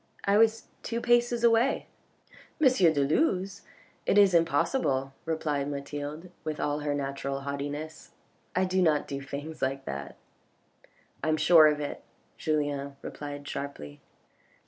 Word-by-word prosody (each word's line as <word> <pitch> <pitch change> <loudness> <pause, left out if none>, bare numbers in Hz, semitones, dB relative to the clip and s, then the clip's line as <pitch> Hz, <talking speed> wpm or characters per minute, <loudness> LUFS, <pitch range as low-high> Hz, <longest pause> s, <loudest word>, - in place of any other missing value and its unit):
I 200 +1 +4
was 225 0 +3 0.2
two 230 0 -3
paces 240 0 +2
away." 235 +3 +3 0.4
" - - -24
M. 305 - +6
de 175 -9 +4
Luz? 195 - 0 0.5
It - - +3
is 200 -2 +6
impossible," 145 - +1
replied 150 -3 -1
Mathilde 145 +4 -6
with 155 -1 -4
all 145 0 -1
her 145 -1 -1
natural 140 0 -3
haughtiness. 145 +3 -5 0.2
" - - -39
I 185 +1 +3
do 185 0 +1
not 155 -4 +2
do 140 -1 -4
things 145 +3 -7
like 135 +1 -1
that." 70 0 -6 0.5
" - - -33
I 155 - +1
am 155 - +2
sure 155 0 +7
of 150 -1 +1
it," 145 -1 -5 0.4
Julien 145 -3 -1
replied 145 -1 -7
sharply. 75 - -6
150 Hz, 145 wpm, -28 LUFS, 140-185 Hz, 0.5 s, sure